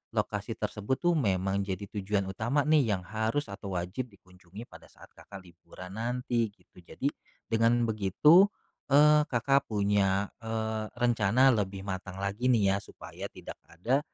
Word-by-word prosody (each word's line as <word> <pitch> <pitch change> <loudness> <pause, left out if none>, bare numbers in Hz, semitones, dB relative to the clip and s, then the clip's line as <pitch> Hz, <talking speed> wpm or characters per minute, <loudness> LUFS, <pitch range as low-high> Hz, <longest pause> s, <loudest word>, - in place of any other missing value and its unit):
lokasi - - -2
tersebut 105 +6 -2
tuh, 175 0 +4
memang 95 -4 0
jadi 95 +1 -4
tujuan 100 0 0
utama 115 +9 0
nih 150 -8 +3
yang 95 - -6
harus 110 +6 -2
atau 100 -1 -7
wajib 90 +9 -3
dikunjungi 90 +2 -13
pada - - -14
saat - - -17
Kakak 100 -1 -11
liburan 90 +2 -12
nanti 120 0 -1
gitu. 100 -2 -22
Jadi 135 +10 -3 0.4
dengan 115 +1 +3
begitu, 115 - +5 0.4
eee, 150 +2 +5
Kakak 135 +3 +1
punya, 100 -2 +1
eee, 110 -1 -3
rencana 120 +1 +3
lebih 100 -3 -2
matang 95 -1 -5
lagi 100 +6 -1
nih 105 -6 +3
ya, - - +1
supaya - - -9
tidak - - -10
ada 115 +11 0
110 Hz, 150 wpm, -29 LUFS, 95-125 Hz, 0.4 s, begitu